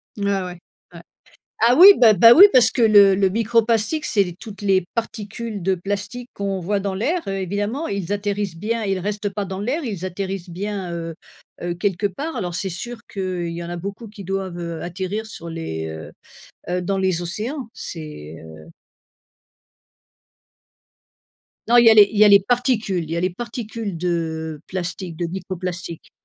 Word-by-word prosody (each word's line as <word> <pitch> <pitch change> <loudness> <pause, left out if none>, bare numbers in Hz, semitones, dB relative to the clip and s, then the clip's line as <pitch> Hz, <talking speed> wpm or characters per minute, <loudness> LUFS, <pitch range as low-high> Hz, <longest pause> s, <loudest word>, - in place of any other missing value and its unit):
Ah 200 -2 -1
ouais, 180 - -6 0.4
ouais. - - -10 0.7
Ah 245 - +5
oui, 390 +4 +10
beh, 230 -3 +7
bah, 230 +6 +8
oui, 390 - +10
parce 240 -4 +6
que 240 - -1
le 205 -3 +7
le 190 -1 +2
microplastiques, 230 +6 +1
c'est 205 - +3
les 175 -2 -7
toutes 205 0 -10
les 190 -3 +2
particules 220 -2 -5
de 190 +1 +1
plastique 205 +6 -5
qu'on 195 -2 -3
voit 200 +3 -1
dans 195 -1 -2
l'air 325 - -1
évidemment 205 - -2
ils 200 -1 -3
atterrissent 205 -3 -2
bien, 225 +4 -2
ils 195 -1 -1
restent 205 +2 -3
pas 200 0 -4
dans 190 +1 -5
l'air, 270 +10 -2
ils 195 -6 -4
atterrissent 185 0 -5
bien, 190 0 -4
heu 165 -1 -5 0.5
heu, 175 - -2
quelque 195 +2 -1
part 290 - -5
alors 175 -2 -3
c'est 190 +1 -2
sûr 235 +7 -6
qu'il 185 -3 -3
y 170 0 -6
en 170 - -7
a 175 - -4
beaucoup 200 +6 -7
qui 205 -1 -11
doivent, 190 -1 -4
heu, 170 -2 -5
atterrir 190 +5 -4
sur 170 -6 -9
les 160 - -5
heu 80 0 -8 0.6
heu, 180 0 -1
dans 195 +2 -1
les 185 -2 0
océans, 225 - -4
c'est, 150 - -8
heu 80 0 -13 3.0
Non 235 - +3
il 240 -1 +7
y - - +9
a 220 - +8
les 205 -2 +8
il - - -3
y 215 - +7
a 210 - +7
les 200 - +8
particules, 220 -4 0
il 160 - -9
y 165 - -1
a - - 0
les 185 +1 +1
particules 225 -2 -6
de 160 -3 -3
plastique, 180 -2 -5
de 175 - -2
microplastiques. 180 -2 -6
195 Hz, 185 wpm, -21 LUFS, 175-220 Hz, 3.0 s, oui